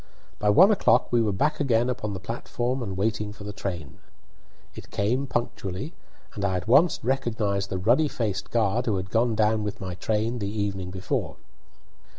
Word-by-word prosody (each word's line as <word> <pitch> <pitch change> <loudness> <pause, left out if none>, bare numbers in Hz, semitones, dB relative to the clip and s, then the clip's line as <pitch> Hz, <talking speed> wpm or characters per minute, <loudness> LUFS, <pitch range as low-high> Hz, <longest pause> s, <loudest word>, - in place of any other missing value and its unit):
By 105 - +2
one 185 - +7
o'clock 210 - +3
we 120 - +5
were 110 -2 +1
back 150 +11 0
again 120 -4 +2
upon 120 -5 -3
the - - -5
platform 120 +5 -3
and 100 -5 -4
waiting 105 +1 -1
for 105 0 -11
the 105 0 -6
train. 85 -8 -5 0.7
It - - -11
came 125 +7 0
punctually, 120 - -3 0.4
and 100 - -5
I 95 -2 +1
at 90 - -6
once 160 +9 +5
recognised 110 -6 0
the 95 - -2
ruddy 120 +11 +3
faced 105 -7 -3
guard 115 +1 +1
who 105 -3 +1
had 95 0 -5
gone 115 0 +2
down 110 0 +2
with 105 -1 -4
my 95 -1 -5
train 110 +6 -1
the 100 -2 -2
evening 100 -3 -3
before. 95 0 -3
105 Hz, 180 wpm, -26 LUFS, 100-120 Hz, 0.7 s, one